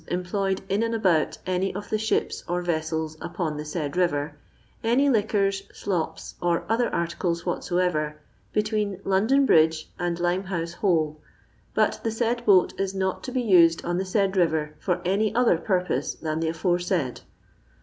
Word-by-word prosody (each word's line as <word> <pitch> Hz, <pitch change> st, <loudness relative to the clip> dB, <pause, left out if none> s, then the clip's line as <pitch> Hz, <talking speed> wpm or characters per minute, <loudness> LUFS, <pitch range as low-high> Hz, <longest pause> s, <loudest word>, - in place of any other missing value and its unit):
•ODi -, -, -4 dB
employed 190 Hz, +2 st, -1 dB
in 200 Hz, +3 st, 0 dB
and 230 Hz, 0 st, 0 dB
abont 180 Hz, -8 st, +2 dB
anjr 185 Hz, +1 st, -1 dB
of 205 Hz, +1 st, -7 dB
the 215 Hz, -, +2 dB
tbipe 220 Hz, +1 st, -1 dB
or 180 Hz, +1 st, -1 dB
TOMeli 160 Hz, -2 st, -2 dB
upon 165 Hz, -3 st, -3 dB
the 150 Hz, 0 st, -6 dB
laid 150 Hz, -4 st, -1 dB
rirer, 150 Hz, -5 st, +1 dB, 0.5 s
any 245 Hz, +5 st, +3 dB
liquon, 205 Hz, -3 st, +2 dB, 0.2 s
ilopiy 180 Hz, -5 st, -3 dB
or 170 Hz, -1 st, +1 dB
other 230 Hz, +2 st, +1 dB
articles 170 Hz, 0 st, -2 dB
whatsoever, 175 Hz, -4 st, -1 dB, 0.3 s
between 210 Hz, -2 st, -1 dB
London 220 Hz, +9 st, +3 dB
Bridge 160 Hz, -6 st, +3 dB
and 175 Hz, -1 st, -1 dB
Limehouse 175 Hz, -1 st, -1 dB
Hole; 160 Hz, -5 st, 0 dB, 0.5 s
but -, -, +2 dB
the 225 Hz, -, 0 dB
said 235 Hz, +1 st, -1 dB
boat 190 Hz, -3 st, +5 dB
is 195 Hz, 0 st, -1 dB
not 190 Hz, -1 st, -1 dB
to 255 Hz, -, -5 dB
be 255 Hz, -1 st, 0 dB
used 170 Hz, -6 st, +5 dB
on 175 Hz, 0 st, 0 dB
the 190 Hz, -, -1 dB
said 195 Hz, 0 st, +1 dB
rirer 160 Hz, -4 st, +1 dB
for 180 Hz, -2 st, -1 dB
any 200 Hz, +4 st, +1 dB
other 235 Hz, -9 st, +4 dB
purpose 180 Hz, -8 st, -1 dB
than 155 Hz, -1 st, -3 dB
the 165 Hz, -, -1 dB
aforesaid. 175 Hz, -4 st, -1 dB
180 Hz, 160 wpm, -25 LUFS, 165-200 Hz, 0.5 s, boat